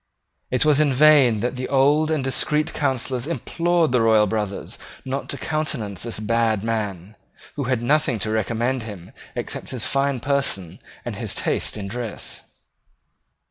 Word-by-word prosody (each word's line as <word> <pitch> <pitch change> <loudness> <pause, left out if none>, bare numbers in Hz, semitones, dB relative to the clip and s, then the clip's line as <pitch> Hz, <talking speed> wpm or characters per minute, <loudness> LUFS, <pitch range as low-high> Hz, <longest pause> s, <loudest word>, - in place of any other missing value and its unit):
It 125 +3 +2
was 150 -2 +5
in 150 -2 +4
vain 135 -6 +6
that 125 +2 -2
old 145 +3 +3
and 155 -4 0
discreet 150 +4 +1
counsellors 130 -2 -1
implored 170 +1 +1
the 125 -2 +3
royal 110 -1 +5
brothers 105 -1 -3 0.3
not 135 +1 -3
to - - -3
countenance 140 - -3
this 115 -2 -4
bad 110 -1 +1
man, 105 -4 -3 0.4
who 140 - -2
had 125 -2 0
nothing 145 -1 +2
to 110 - -2
recommend 115 +4 0
him 100 -6 -9 0.2
except - - -4
his 125 -4 -2
fine 140 -1 0
person 125 - -1 0.3
and - - -4
his - - -3
taste - - -1
in 100 -2 -5
dress. 115 +1 -5
125 Hz, 150 wpm, -23 LUFS, 110-140 Hz, 0.4 s, vain